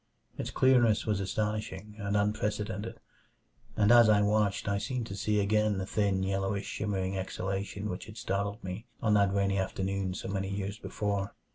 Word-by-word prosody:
Its - - -4
clearness 120 -4 +4
was 105 -3 +1
astonishing 105 0 -3
and 100 0 0
unprecedented 105 +1 -1 0.8
and 105 +1 +5
as 120 -2 +8
I 105 -1 +5
watched 105 -1 +1
I 100 0 +1
seemed 125 +2 -2
to 100 - -6
see 105 +1 +1
again 105 0 +2
the 95 - -2
thin, 100 -2 +1
yellowish, 95 +1 -1
shimmering 95 -3 -2
exhalation 95 +2 -3
which 90 0 -5
had 110 0 -10
startled 100 +2 -2
me 95 +6 -6
on 110 -2 +2
that 100 -2 +4
rainy 100 0 +1
afternoon 95 0 -2
so - - -5
many 95 0 -2
years 100 +1 -3
before. 100 -1 -2
100 Hz, 165 wpm, -30 LUFS, 95-105 Hz, 0.8 s, as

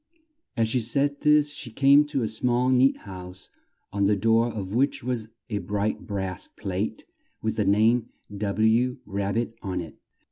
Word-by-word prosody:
As 115 -1 +2
she 125 +3 0
said 140 +5 0
this 150 -1 +4
she 135 -4 -6
came 140 +5 +5
to 145 -4 -2
a - - 0
small 120 +3 +1
neat 130 +1 +4
house 95 -1 -9 0.4
on 100 -1 +2
the 105 - +3
door 115 +3 +3
of 100 -3 -5
which 135 +2 +1
was 120 -3 -2 0.2
a 105 -2 -2
bright 105 +1 -2
brass 95 -2 -3
plate 100 +1 -4 0.4
with - - -1
the - - +1
name 110 +4 +3 0.3
W. 110 +5 +1
Rab 100 0 -2
bit 115 0 -1
on 95 -3 -3
it. 85 -3 -8
110 Hz, 170 wpm, -26 LUFS, 100-125 Hz, 0.4 s, came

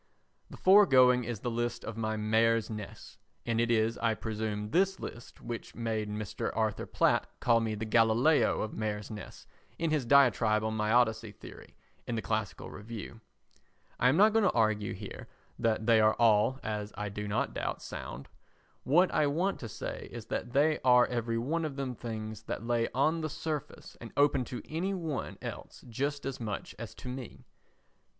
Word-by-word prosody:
The - - -10
foregoing 130 - +6
is 115 -3 -4
the 120 - -2
list 120 0 -2
of 115 - -5
my 110 -1 -2
"mares' 115 +1 +2
nests," 105 -2 -8 0.3
and 115 -1 +1
it 120 - +1
is, 115 0 +2
I 115 -1 +1
presume, 105 -1 -4
this 190 +2 +2
list 120 - -9
which 120 -1 -6
made 110 -2 -2
Mr. 105 -1 -3
Arthur 110 -2 -1
Platt - - +2
call 115 -1 +4
me 110 -1 -1
the 110 +1 -4
Galileo 115 +7 +3
of 110 - -5
Mares' 105 -1 -3
Nests 105 -2 -9 0.3
in 165 -1 -1
his 150 -3 +1
diatribe 115 -5 +4
on 110 0 -1
my 105 0 0
Odyssey 110 -2 +2
theory - - -13 0.3
in 120 - -2
the 110 - -1
Classical 110 -3 -3
Review. 110 +1 -8 0.8
I 125 - +5
am 140 - +2
not 210 +2 +6
going 225 - +4
to 200 - +3
argue 110 -3 +1
here 100 0 -8 0.3
that 110 -1 +1
they 115 -1 +5
are 110 0 +4
all, 115 +3 +3
as 105 -1 -3
I 105 - -3
do 105 +1 -5
not 105 +2 -1
doubt, - - -3
sound; 70 +3 -7 0.6
what 175 +7 +4
I 150 - +3
want 175 +7 0
to 115 - -6
say - - -6
is - - -7
that 120 - -4
they 150 +3 +3
are 125 -1 +6
every 115 -1 -2
one 155 +8 -1
of 150 -3 -3
them 135 -2 -3
things 110 -3 -6
that 115 - -4
lay 115 -1 +1
on 155 +5 +2
the 155 - -2
surface 155 -1 -5
and 115 - -8
open 140 -3 +3
to 125 - -6
any 185 +5 -2
one 160 -7 -4
else - - -8
just 140 +5 -3
as 135 -1 -4
much 110 -4 -5
as 115 -1 -7
to - - -10
me. 125 -1 -7
115 Hz, 185 wpm, -30 LUFS, 110-135 Hz, 0.8 s, foregoing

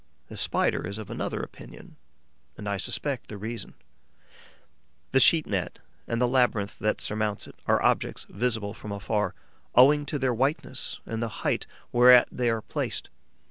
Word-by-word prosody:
The - - -8
Spider - - +1
is 100 +2 -5
of 110 -3 -8
another - - -3
opinion; - - -12 0.6
and 105 - -7
I 100 0 -1
suspect 135 +6 -2
the 105 - -7
reason. 110 +3 -6 1.4
The 135 - +5
sheet 160 +3 +6
net 95 -4 -2 0.3
and 115 - -1
the 125 - +3
labyrinth 120 -5 +1
that 110 0 0
surmounts 105 -1 -2
it - - -12
are - - +4
objects - - +1
visible 110 -2 -2
from 105 -1 -9
afar, 105 +1 -1 0.4
owing 145 +4 +6
to 150 - -1
their 130 -2 +1
whiteness 135 +6 -2
and 115 0 -4
the 115 -2 -4
height - - 0 0.3
whereat 125 0 +7
they 125 -1 0
are 115 -1 -1
placed. - - -4
115 Hz, 160 wpm, -27 LUFS, 105-125 Hz, 1.4 s, whereat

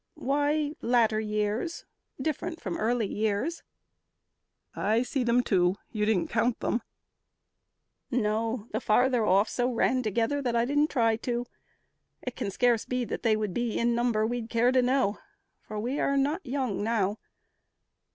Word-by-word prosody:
"Why, 290 +2 0
latter 230 -2 +3
years 215 +8 -2 0.3
Different 320 +4 -3
from 190 - -4
early 230 +1 +1
years." 220 - -1 1.1
"I 220 +3 +1
see 255 +1 -1
them, 240 +1 +3
too. 185 -4 +2 0.2
You 210 -2 0
didn't 210 -5 +1
count 230 +1 +1
them?" 235 - 0 1.3
"No, 225 -1 0
the 220 - -2
further 245 +2 +3
off 200 +1 +4
So 245 +2 0
ran 250 +2 +2
together 230 +5 0
that 245 -3 -1
I 235 0 +3
didn't 290 +4 +2
try 230 -4 +2
to. 240 +1 -2 0.8
It 250 - -5
can - - -3
scarce 235 +2 +2
be 250 -1 -2
that - - -4
they 225 -2 +3
would 210 -4 -2
be 235 0 -1
in 235 0 +2
number 235 -2 +1
We'd 235 0 -3
care 240 +2 +3
to 255 0 +4
know, 250 -4 +1 0.4
for 215 - -7
we 250 +7 -2
are 275 - +1
not 295 +7 0
young 255 -6 -2
now. 215 -2 0
235 Hz, 155 wpm, -28 LUFS, 215-255 Hz, 1.3 s, off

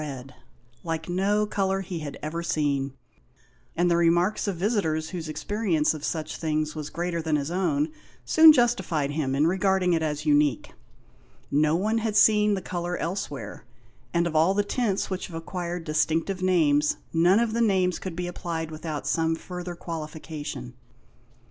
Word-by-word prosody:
red, 135 -3 -7 0.5
like 165 -1 -3
no 200 +4 +1
colour 195 -2 0
he 180 -2 -5
had 145 -3 -6
ever 160 +3 -3
seen, 140 -5 -1 0.8
and 175 +1 +2
the - - +4
remarks 175 +5 +2
of 200 - -1
visitors 165 -5 0
whose 165 -3 -5
experience 180 -3 0
of 155 -2 -8
such 155 -1 -3
things 155 -1 -1
was 155 -2 -5
greater 170 -1 -2
than 160 -1 0
his 145 +2 -2
own 160 -5 +1 0.4
soon 320 0 +8
justified 235 - +1
him 145 -3 -1
in 145 +3 +3
regarding 190 0 +2
it 165 - +1
as 150 -1 -2
unique. 145 -5 +2 0.8
No 150 +2 +3
one 215 +6 +1
had 220 -2 -2
seen 210 -1 +5
the 190 - -5
colour 175 0 -3
elsewhere; 165 -5 -5 0.5
and 170 0 +1
of 165 -2 -3
all 165 +5 +4
the 205 - +2
tints 205 -3 -1
which 185 - -3
have 170 - -10
acquired 175 +1 -4
distinctive 160 +4 0
names, 150 -5 +3 0.2
none 175 +4 +4
of 235 -2 0
the 235 - +1
names 190 -5 +2
could 185 -3 -6
be 180 +1 -3
applied 165 -2 -4
without 155 -1 -5
some 165 0 +1
further 180 +1 -7
qualification. 155 -6 -6
170 Hz, 165 wpm, -26 LUFS, 155-190 Hz, 0.8 s, soon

